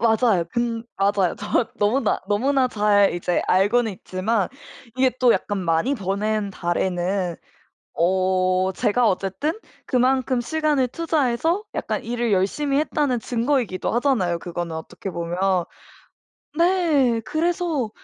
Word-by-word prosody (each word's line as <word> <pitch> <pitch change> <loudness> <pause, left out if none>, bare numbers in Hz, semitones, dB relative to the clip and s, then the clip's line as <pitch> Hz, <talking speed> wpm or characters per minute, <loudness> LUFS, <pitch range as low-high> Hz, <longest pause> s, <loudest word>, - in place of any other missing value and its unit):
맞아요. 220 -5 +3
근 235 -1 -1
맞아요. 195 -2 +1
정확 210 +3 -1
너무나, 215 +3 +1
너무나 260 +5 +2
잘 205 -3 +3
이제 175 0 -1
알고는 210 +4 +2
있지만 190 +3 -1 0.5
이게 260 0 +3
또 245 -2 +6
약간 205 -2 -2
많이 175 +10 +1
버는 205 0 -1
달에는 180 0 -1 0.6
어 185 +1 +1
제가 225 +4 +2
어쨌든 195 - -1 0.3
그만큼 255 0 +1
시간을 300 -1 0
투자해서 320 - 0
약간 - - -2
일을 235 -1 -1
열심히 275 +10 +1
했다는 290 -5 0
증거이기도 240 -5 -1
하잖아요 230 -9 +1
그거는 175 -1 -5
어떻게 160 +4 -7
보면. 175 +2 0 0.9
네 320 -10 +3
그래서 325 -6 -1
220 Hz, 275 characters per minute, -22 LUFS, 185-260 Hz, 0.9 s, 또